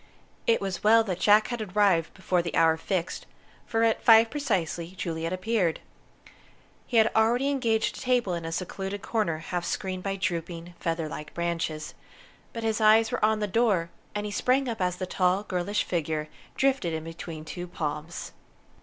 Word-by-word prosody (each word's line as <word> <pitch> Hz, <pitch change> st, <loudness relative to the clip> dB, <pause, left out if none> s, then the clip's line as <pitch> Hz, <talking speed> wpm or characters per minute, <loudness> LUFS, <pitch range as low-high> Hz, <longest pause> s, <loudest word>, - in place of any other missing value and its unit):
It 230 Hz, -, +4 dB
was 195 Hz, -2 st, -3 dB
well 225 Hz, +2 st, +6 dB
that 185 Hz, -5 st, -3 dB
Jack 210 Hz, +1 st, +5 dB
had 240 Hz, -2 st, -3 dB
arrived 195 Hz, -5 st, +2 dB
before 185 Hz, -2 st, 0 dB
the 170 Hz, -, -4 dB
hour 165 Hz, -1 st, +5 dB
fixed, 170 Hz, +1 st, -3 dB, 0.4 s
for 225 Hz, 0 st, +1 dB
at 225 Hz, -1 st, +2 dB
five 225 Hz, 0 st, +7 dB
precisely 185 Hz, -, -2 dB
Juliet 165 Hz, -2 st, -3 dB
appeared. 185 Hz, -2 st, 0 dB, 1.1 s
He 240 Hz, -, 0 dB
had 220 Hz, 0 st, +5 dB
already 240 Hz, +5 st, +3 dB
engaged 230 Hz, -5 st, +1 dB
a -, -, -8 dB
table 245 Hz, -7 st, +1 dB
in 170 Hz, -1 st, -3 dB
a 165 Hz, -, -4 dB
secluded 195 Hz, +3 st, -4 dB
corner 210 Hz, -8 st, 0 dB
half 175 Hz, +2 st, -4 dB
screened 185 Hz, +1 st, -3 dB
by 195 Hz, +1 st, -2 dB
drooping, 175 Hz, -2 st, -3 dB
feather 165 Hz, -1 st, -1 dB
like 150 Hz, 0 st, -8 dB
branches; 165 Hz, -3 st, -2 dB, 0.6 s
but 230 Hz, -, -6 dB
his 220 Hz, 0 st, 0 dB
eyes 220 Hz, +1 st, +5 dB
were -, -, -2 dB
on 215 Hz, 0 st, +3 dB
the -, -, +2 dB
door, 200 Hz, -5 st, +1 dB, 0.2 s
and 210 Hz, 0 st, -2 dB
he 210 Hz, -, -4 dB
sprang 255 Hz, +5 st, +1 dB
up 225 Hz, -4 st, -3 dB
as 180 Hz, -1 st, +1 dB
the 185 Hz, +1 st, -4 dB
tall, 185 Hz, +2 st, +1 dB
girlish 195 Hz, +1 st, -1 dB
figure 155 Hz, -3 st, -2 dB, 0.3 s
drifted 265 Hz, -11 st, +1 dB
in 160 Hz, 0 st, -3 dB
between 165 Hz, -1 st, -8 dB
two 175 Hz, +3 st, -6 dB
palms. 155 Hz, 0 st, -5 dB
185 Hz, 175 wpm, -27 LUFS, 170-220 Hz, 1.1 s, five